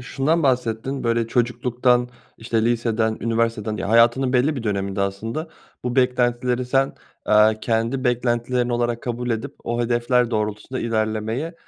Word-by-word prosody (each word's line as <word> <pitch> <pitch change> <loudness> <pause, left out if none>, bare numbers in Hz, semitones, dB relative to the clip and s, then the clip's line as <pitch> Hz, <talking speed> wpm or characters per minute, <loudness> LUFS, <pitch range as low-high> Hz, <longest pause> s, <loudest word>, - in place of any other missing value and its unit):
şundan 140 +6 0
bahsettin, 125 0 -1
böyle, 115 -1 +1
çocukluktan, 125 +1 +1 0.3
işte, 115 -1 -1
liseden 115 -2 0
üniversiteden 115 -2 -1
ya, 100 - -4
hayatının 120 +3 +4
belli 135 +4 +2
bir 120 - -4
döneminde 100 -2 -2
aslında 115 - -3 0.4
bu 125 +1 -2
beklentileri 125 0 +1
sen, 135 +1 +1 0.3
eee, 110 +1 +5
kendi 115 +3 -1
beklentilerin 120 0 0
olarak 120 -1 -1
kabul 120 0 -3
edip 115 +5 -3
o 120 0 -1
hedefler 120 +1 +1
doğrultusunda 105 +3 -3
ilerlemeye, 110 +7 -2
120 Hz, 135 wpm, -22 LUFS, 115-125 Hz, 0.4 s, eee